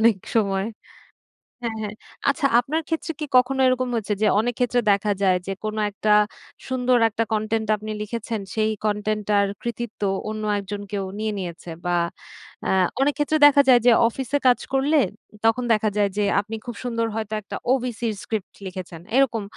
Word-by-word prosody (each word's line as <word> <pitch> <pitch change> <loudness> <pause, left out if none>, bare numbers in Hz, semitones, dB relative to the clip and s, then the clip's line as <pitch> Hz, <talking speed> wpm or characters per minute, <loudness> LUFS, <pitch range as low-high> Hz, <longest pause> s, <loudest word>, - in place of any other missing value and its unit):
অনেক 225 -2 +5 0.2
সময় 195 -2 +1 1.0
হ্যাঁ, 230 -1 -2
হ্যাঁ। 210 -1 -4 0.4
আচ্ছা 280 +1 0
আপনার 305 +7 -1
ক্ষেত্রে 325 0 -2
কি 305 - -2
কখনো 260 +2 +2
এরকম 255 0 +1
হয়েছে 215 -2 -1
যে 215 - +4
অনেকক্ষেত্রে 245 +1 +1
দেখা 200 +1 +1
যায় 185 -2 +4
যে, - - -2
কোন 215 0 -3 0.2
একটা 210 +1 0 0.6
সুন্দর 255 -1 +2
একটা 225 +1 -1
কনটেন্ট 220 0 -1
আপনি 215 +1 -6
লিখেছেন, 225 0 -4
সেই 220 0 +2
কনটেন্টটার 210 -1 +1 0.2
কৃতিত্ব 235 -2 -5 0.3
অন্য 215 0 -4 0.2
একজন 200 +1 -5
কেউ 200 -2 -2 0.2
নিয়ে 215 0 -1
নিয়েছে? 175 -1 -7 0.2
বা 175 0 +1 0.7
অ্যা - - 0 0.3
অনেক 285 +2 +3
ক্ষেত্রে 295 +1 +1
দেখা 285 0 +6
যায় 245 -2 +8
যে - - +9 0.2
অফিসে 265 +4 -2
কাজ 250 - +5
করলে, 285 +3 +3 0.3
উম 210 - -16
তখন 225 +2 +3
দেখা 215 0 +2
যায় 205 -1 +3
যে 210 - +2 0.2
আপনি 215 +2 -7
খুব 240 -2 -6
সুন্দর 230 -2 -1
হয়তো 220 -1 -3
একটা 200 - -7 0.2
ওবিসির 240 -4 -2
স্ক্রিপ্ট 215 -4 -4
লিখেছেন। 180 -3 -7 0.2
এরকম। 235 -5 +2
220 Hz, 170 wpm, -23 LUFS, 210-250 Hz, 1.0 s, যে